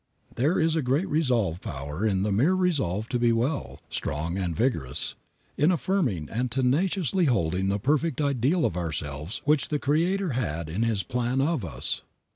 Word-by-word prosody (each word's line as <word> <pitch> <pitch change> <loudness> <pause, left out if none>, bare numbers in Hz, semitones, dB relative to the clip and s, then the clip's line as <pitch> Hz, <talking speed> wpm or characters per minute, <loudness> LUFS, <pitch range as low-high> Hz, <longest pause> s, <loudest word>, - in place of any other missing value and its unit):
There 145 +9 +2
is 160 -1 +2
a 160 - +2
great 140 +8 +1
restorative 120 - +1
power 75 +5 -5
in 95 -2 +1
the 105 - 0
mere 135 - +3
resolve 135 - 0
to 125 - 0
be 120 -1 +4
well, 125 +6 -1
strong 80 +4 -3
and 90 -4 -2
vigorous, 110 - -1 0.4
in 150 +4 +4
affirming 155 - 0
and 125 - -2
tenaciously 165 - +1
holding 95 - +1
the 100 +1 +1
perfect 150 +9 +1
ideal 140 +3 +2
of 105 -7 0
ourselves 80 0 -4
which 150 0 +3
the 150 - 0
Creator 170 +6 +1
had 85 -11 -2
in 90 +8 -2
His 115 -4 +1
plan 125 +2 -1
of 145 -3 +1
us. 70 -7 -2
125 Hz, 170 wpm, -26 LUFS, 95-150 Hz, 0.4 s, be